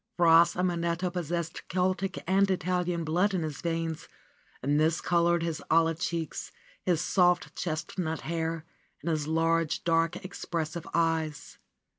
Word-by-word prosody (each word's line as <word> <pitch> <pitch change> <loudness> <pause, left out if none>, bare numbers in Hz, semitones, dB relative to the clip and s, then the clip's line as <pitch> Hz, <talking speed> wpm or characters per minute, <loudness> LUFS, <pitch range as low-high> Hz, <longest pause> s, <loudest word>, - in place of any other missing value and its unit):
Fra 165 -1 +7
Simonetta 175 0 -1
possessed 170 -1 -3
Celtic 185 +1 -1
and 195 +1 +3
Italian 180 -2 0
blood 180 +6 +1
in 175 - 0
his 155 -3 -5
veins, 165 -1 -2 0.6
and 145 +2 +2
this 160 +1 +2
colored 170 -1 +2
his 165 -2 -2
olive 165 0 +3
cheeks, 165 -1 -3 0.3
his 175 -4 +1
soft 180 -1 +2
chest 170 +2 -4
nut 160 -2 -2
hair 165 -1 -2 0.4
and 170 - 0
his 155 -2 -1
large, 165 0 +1
dark, 165 0 +2
expressive 170 -3 -4
eyes. 160 -2 -1
170 Hz, 135 wpm, -29 LUFS, 160-175 Hz, 0.6 s, Fra